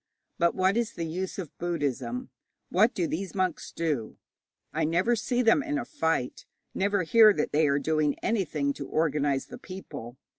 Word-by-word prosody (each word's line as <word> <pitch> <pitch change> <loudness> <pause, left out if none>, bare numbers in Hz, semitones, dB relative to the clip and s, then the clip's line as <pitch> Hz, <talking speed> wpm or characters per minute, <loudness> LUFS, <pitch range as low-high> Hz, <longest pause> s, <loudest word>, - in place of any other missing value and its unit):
But 170 0 +3
what 190 +3 +2
is 235 -1 0
the 170 - -4
use 180 +4 -4
of 175 -7 -6
Buddhism? 135 -8 -2 0.4
What 215 +6 +3
do 175 - +1
these 185 +4 -4
monks 185 -3 -1
do? 150 -9 -2 0.6
I - - 0
never 175 +9 +2
see 245 +2 0
them 230 +5 +5
in 295 0 -2
a - - -3
fight, 160 - -2 0.3
never 200 0 +1
hear 220 +5 +7
that 150 - -1
they 155 +1 +3
are 140 0 +2
doing 155 -1 +1
anything 155 -10 0
to 140 - -7
organize 145 -3 +1
the 245 0 -10
people. 185 - -9
170 Hz, 175 wpm, -28 LUFS, 145-200 Hz, 0.6 s, hear